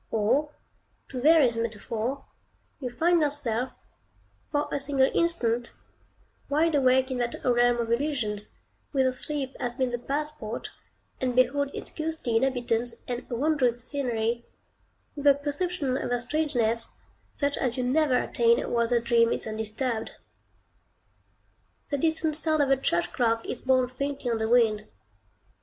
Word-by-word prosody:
Or, 240 +8 +1 0.6
to 255 -2 -5
vary 305 -3 +6
the 230 0 -3
metaphor, 230 +4 -3 0.5
you 255 -3 -3
find 335 +7 +2
yourself, 265 -5 -1 0.8
for 295 0 0
a - - -1
single 275 -1 +2
instant, 245 -9 +1 0.8
wide 315 +3 +2
awake 260 -1 +3
in 255 - -2
that 240 -1 -1
realm 245 -1 +4
of 230 -1 -2
illusions, 235 -6 -1 0.4
whither 265 -2 +3
sleep 270 +1 -2
has 240 -1 -3
been 255 -1 0
the 240 - -2
passport, 280 -4 -4 0.5
and 255 -1 -1
behold 270 +3 +3
its - - -6
ghostly 315 -7 -2
inhabitants 240 -2 0
and 245 0 -5
wondrous 250 -2 +1
scenery, 235 -4 -1 0.7
with 290 -1 -1
a 280 - +8
perception 290 0 -2
of - - -3
their 245 0 0
strangeness, 240 -6 0 0.4
such 285 -1 0
as 250 -2 -1
you 255 - 0
never 265 +1 +2
attain 235 -1 +3
while 235 -1 +2
the 240 0 +2
dream 235 0 +3
is - - -1
undisturbed. 220 +2 -3 1.8
The 285 - 0
distant 320 0 +1
sound 310 -1 +2
of 275 - 0
a 270 - +5
church 170 -9 0
clock 230 -2 +1
is - - -5
borne 260 -1 +3
faintly 270 0 -3
on 225 - 0
the 220 0 -1
wind. 220 -3 +3
255 Hz, 145 wpm, -27 LUFS, 235-285 Hz, 1.8 s, a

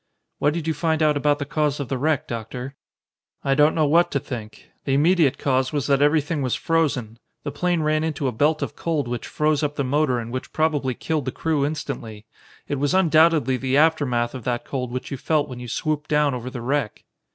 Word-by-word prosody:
"What 145 +2 +2
did 165 -3 -3
you 160 - 0
find 160 +1 0
out 150 -1 +3
about 145 0 +2
the 145 - -4
cause 150 0 0
of 140 - -3
the 135 - -2
wreck, 150 0 0
Doctor?" 120 +3 -6 0.7
"I 135 - +2
don't 150 +2 +4
know 155 -2 +3
what 165 +4 +4
to 140 - 0
think. 115 -5 -8 0.2
The 135 - +1
immediate 160 -1 +3
cause 130 -1 +1
was 145 -3 -1
that 140 -1 +2
everything 150 +1 +2
was 130 -3 0
frozen. 135 -9 -1 0.2
The 145 - -3
plane 175 +3 0
ran 155 0 +1
into 150 -3 -1
a - - 0
belt 150 +7 +1
of - - -5
cold 155 -6 -1
which 120 0 -4
froze 150 -1 +1
up 150 -1 -1
the 140 - -1
motor 140 -1 +1
and 115 0 -5
which 130 +1 -5
probably 145 -5 0
killed 155 -4 -2
the 130 - -2
crew 155 -1 0
instantly. 115 -8 -6 0.4
It 145 - -2
was 145 +5 +1
undoubtedly 160 -6 +4
the 130 +2 0
aftermath 140 -7 +2
of 130 -3 -7
that 120 -1 -2
cold 125 -3 -4
which 130 +1 -5
you 135 - -3
felt 150 +2 0
when 125 -3 -8
you 125 - -7
swooped 155 +4 -2
down 150 -2 +2
over 125 0 -5
the 125 -2 -7
wreck." 130 -2 -2
145 Hz, 220 wpm, -23 LUFS, 130-155 Hz, 0.7 s, don't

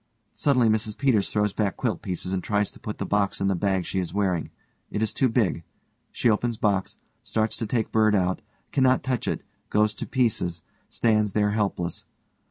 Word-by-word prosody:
Suddenly_ 130 -5 +3
MRS 110 -1 -2
PETERS 125 -8 +2
_throws 105 -1 +1
back 100 -3 0
quilt - - -1
pieces 90 +1 -3
and 90 -2 -1
tries 105 -1 0
to - - -16
put 105 - -5
the - - -3
box 100 -1 +1
in 100 - +1
the 95 - +2
bag 95 0 0
she 95 - -2
is 90 0 -4
wearing. 95 -5 0 0.4
It 105 - -1
is 110 - -1
too 130 - +2
big. 110 -8 +1 0.5
She - - 0
opens 115 +1 +1
box, 100 -3 0 0.2
starts 110 0 -1
to 115 - -2
take 115 -1 -1
bird 110 -1 +4
out, 95 +1 +1 0.3
cannot 130 -2 +3
touch 130 -2 -1
it, - - -2 0.3
goes 105 0 +3
to - - -6
pieces, 90 - 0 0.3
stands 110 -3 +2
there 105 -1 +2
helpless. 100 -5 -1
105 Hz, 190 wpm, -25 LUFS, 95-110 Hz, 0.5 s, bird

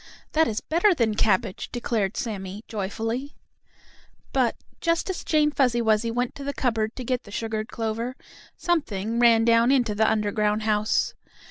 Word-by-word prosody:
"That 320 0 +3
is 215 0 -2
better 355 +4 +3
than 230 -6 +1
cabbage," 205 -1 0
declared 225 -4 -1
Sammie, 200 -2 -4
joyfully. 225 +6 -3 1.0
But, 255 -4 +2 0.2
just 335 +2 0
as 365 - -6
Jane 300 -1 +2
Fuzzy 250 -5 +2
Wuzzy 220 0 +2
went 245 +1 -1
to 280 - -9
the 280 0 -4
cupboard 225 -3 0
to 255 - -5
get 250 0 -1
the - - -14
sugared 220 +1 -3
clover, 230 +2 -3 0.4
something 230 - -1
ran 230 -2 +5
down 230 +1 +4
into 245 -6 +2
the 220 +1 +3
underground 210 0 0
house. 215 0 +1
230 Hz, 155 wpm, -25 LUFS, 215-255 Hz, 1.0 s, ran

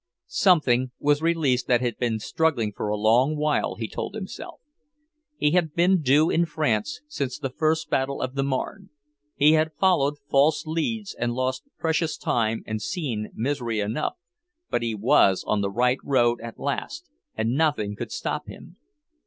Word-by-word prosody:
Something 130 -9 +3
was 145 +1 +2
released 150 -7 +1
that 120 -1 +3
had 120 -3 -2
been 120 -3 0
struggling 115 -2 0
for - - -3
a 105 - 0
long 120 +8 +3
while, 150 0 0
he 115 - -4
told 195 - -5
himself. 200 -4 -7 0.8
He 150 - +2
had 165 -3 +1
been 180 +1 +3
due 145 +3 +4
in 170 +1 +2
France 150 -6 -1
since 140 - -3
the 135 -3 -4
first 160 +3 0
battle 135 +1 0
of 130 0 -3
the 135 - -1
Marne; 140 +9 -3 0.5
he 150 +2 +5
had 160 0 +2
followed 150 -7 +3
false 145 +4 +3
leads 200 +7 -2
and 120 0 -2
lost 130 0 -2
precious 160 0 0
time 115 -1 0
and 110 0 -4
seen 125 - -3
misery 120 -3 -1
enough, 110 +8 -1 0.6
but - - +1
he 115 -2 -2
was 105 -3 +3
on 105 -1 +1
the 100 - 0
right 125 +5 +1
road 120 -4 +2
at 115 0 -8
last, 285 - -4 0.3
and 110 +1 0
nothing 140 -9 +1
could - - -6
stop - - -3
him. - - -12
140 Hz, 170 wpm, -25 LUFS, 120-160 Hz, 0.8 s, he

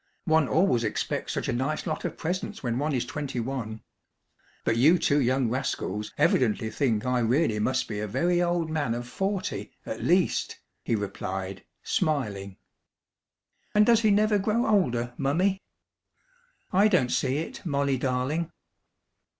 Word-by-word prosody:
One 160 -3 +3
always 160 -9 +2
expects 110 - -2
such - - -2
a - - 0
nice 135 +5 -1
lot 155 -1 -3
of 170 -2 -4
presents 180 +3 -3
when 120 0 -1
one 150 +2 0
is 125 -3 0
twenty 135 -1 -4
one! 115 -3 -4 0.8
But 115 - +2
you 150 +10 +5
two 145 -3 +2
young 130 0 +2
rascals 110 -4 -2
evidently 110 -2 +2
think 115 -3 0
I 125 0 +1
really 120 -1 +2
must 130 +4 0
be 105 -2 -4
a 105 - -2
very 175 - +1
old 175 -1 +1
man 145 -7 0
of 120 0 -5
forty 195 +8 -3 0.2
at - - -5
least!" - - +1 0.2
he 115 - 0
replied, 95 -2 -4 0.2
smiling. 105 - -1 1.2
"And 210 0 +6
does 230 -1 +5
he 220 - +3
never 210 0 +3
grow 220 +4 +1
older, 120 - +1
Mummy?" 185 +8 +1 1.1
"I 200 +3 +6
don't 155 -12 +2
see 130 - +1
it, 160 - -5
Molly 140 -4 0
darling." 135 +6 -1
135 Hz, 150 wpm, -27 LUFS, 120-170 Hz, 1.2 s, And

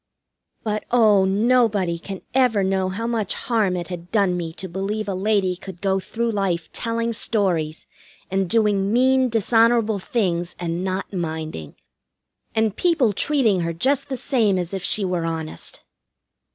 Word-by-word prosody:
But, 215 -1 -2
oh, 215 -5 +5
nobody 205 -4 +2
can 195 +2 -7
ever 245 -6 +3
know 190 0 0
how 205 +5 -4
much 225 -4 -1
harm 215 -6 0
it 175 -1 -5
had 175 -1 -7
done 200 -5 +2
me 170 -2 -3
to 190 - -6
believe 195 +4 -3
a 200 - -1
lady 190 -1 +1
could 180 -1 -10
go 195 0 +1
through 230 +4 -2
life 190 -5 -1
telling 230 0 -1
stories, 175 -8 0 0.5
and 190 -1 0
doing 205 -3 +2
mean, 260 +2 +3
dishonorable 225 -1 +3
things, 180 -5 -1
and 170 0 -3
not 190 +2 -3
minding. 160 - -4 0.8
And 220 -2 +1
people 315 - +2
treating 235 -5 +2
her 170 -1 -1
just 275 - 0
the 265 - -2
same 225 -7 +1
as 180 0 -3
if 190 - -3
she 205 - +1
were 180 -2 -1
honest! 160 -1 -4
200 Hz, 155 wpm, -22 LUFS, 180-230 Hz, 0.8 s, oh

